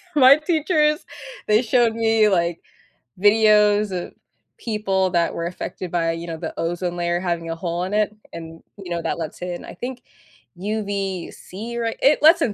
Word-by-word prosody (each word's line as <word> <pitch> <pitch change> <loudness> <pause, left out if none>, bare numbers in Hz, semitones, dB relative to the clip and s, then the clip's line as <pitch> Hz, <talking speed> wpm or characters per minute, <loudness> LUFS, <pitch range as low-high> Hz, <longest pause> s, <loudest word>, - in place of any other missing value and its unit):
My 270 -1 +8
teachers, 305 -1 +1 0.4
they 215 +3 +4
showed 235 -1 +2
me, 225 -1 +3
like, 170 -3 0 0.6
videos 210 0 +4
of 180 -2 -5 0.4
people 195 -4 0
that 170 -2 +1
were 170 0 -3
affected 180 0 -6
by, 165 -1 +1
you 165 +1 -6
know, 165 -1 -5
the - - -5
ozone 175 +1 -2
layer 175 0 0
having 170 -2 -2
a 165 - -2
hole 170 +1 -3
in 190 +2 -4
it, 210 0 +1 0.2
and, 165 0 -9
you 195 -3 -9
know, 170 -1 -2
that 165 +1 -3
lets 160 0 -6
in, 180 -1 -5
I - - -9
think, 250 +6 -7 0.5
UVC 200 +2 -4
ray 230 -1 -2
it 285 +3 +4
lets 325 +3 +7
in 225 - +1
195 Hz, 170 wpm, -22 LUFS, 175-225 Hz, 0.6 s, My